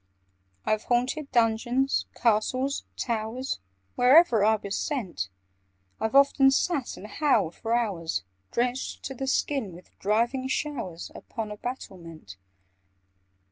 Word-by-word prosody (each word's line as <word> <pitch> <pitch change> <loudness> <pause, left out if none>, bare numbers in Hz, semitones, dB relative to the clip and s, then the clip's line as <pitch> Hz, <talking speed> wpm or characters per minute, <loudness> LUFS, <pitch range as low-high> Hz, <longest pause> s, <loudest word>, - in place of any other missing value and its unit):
"I've 215 0 0
haunted 255 +5 0
dungeons, 240 +3 +2
castles, 255 +5 +1
towers— 235 - -2 0.3
Wherever 250 -3 +6
I 220 +1 +5
was 200 -2 -4
sent: 190 - -2 0.7
I've 220 +4 -1
often 275 -1 +6
sat 270 0 0
and - - -9
howled 215 - +1
for 230 +1 -1
hours, 185 - -1 0.3
Drenched 250 +2 -1
to 270 - -4
the 270 +1 -4
skin 265 -7 0
with 175 +2 -14
driving 235 +6 +1
showers, 255 - -3
Upon 220 -3 -6
a 210 - -6
battlement. 170 - -8
235 Hz, 115 wpm, -27 LUFS, 210-265 Hz, 0.7 s, Wherever